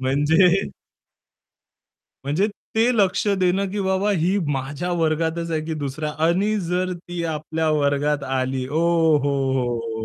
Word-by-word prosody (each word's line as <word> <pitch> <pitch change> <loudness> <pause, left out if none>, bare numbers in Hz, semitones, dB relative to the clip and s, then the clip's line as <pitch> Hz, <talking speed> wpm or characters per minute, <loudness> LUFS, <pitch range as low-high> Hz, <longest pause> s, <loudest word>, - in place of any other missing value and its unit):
म्हणजे 160 +8 +3 1.5
म्हणजे 155 +9 +1 0.3
ते 230 +3 +3
लक्ष 200 0 +2
देणं, 185 +2 +1
की 205 0 -3
बाबा 190 +2 +1
ही 185 +1 +1 0.2
माझ्या 145 +6 -3
वर्गातच 165 0 -1
आहे, 160 -1 0
की 160 0 -3
दुसरया 150 +3 -3 0.2
आणि 200 +5 +1
जर 180 +1 -1
ती 175 0 -6
आपल्या 160 0 -2
वर्गात 145 0 +1
आली 130 -1 -2
ओहोहोहो! 135 -8 +1
160 Hz, 120 wpm, -22 LUFS, 140-180 Hz, 1.5 s, म्हणजे